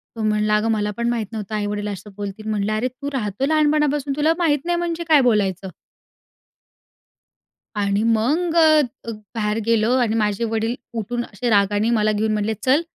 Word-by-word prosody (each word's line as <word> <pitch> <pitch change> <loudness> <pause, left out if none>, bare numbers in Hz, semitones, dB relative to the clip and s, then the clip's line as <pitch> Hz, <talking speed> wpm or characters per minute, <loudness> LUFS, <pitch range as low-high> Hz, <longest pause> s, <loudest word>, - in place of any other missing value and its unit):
तो 225 - -4
म्हणला, 210 0 +2
"अगं 220 +2 +1
मला 210 -1 0
पण 235 0 0
माहीत 235 -2 -1
नव्हतं 215 -1 -5
आई-वडील 205 0 -2
असं 205 0 -6
बोलतील." 205 +1 -6
म्हटलं, 210 0 -1
"अरे 220 +4 0
तू 280 +3 -6
राहतो 215 -1 -2
लहानपणापासून, 295 -2 +1
तुला 310 +2 +3
माहीत 300 -5 +1
नाही 350 0 +1
म्हणजे 340 -1 -2
काय 300 -3 +6
बोलायचं?" 200 -6 +1 2.1
आणि 200 0 +1 0.2
मग 320 +10 0
अ, 315 -2 +6 0.3
ग - - -2 0.2
बाहेर 210 -1 -1
गेलो 230 0 +2
आणि 225 -2 +1
माझे 210 0 0
वडील 225 +2 -1 0.2
उठून 240 +3 -3
असे 220 +4 -4
रागाने 205 +1 +2
मला 215 0 +2
घेऊन 215 +1 0
म्हटले, 210 +1 0
"चल, 260 +8 +2
220 Hz, 170 wpm, -21 LUFS, 210-275 Hz, 2.1 s, काय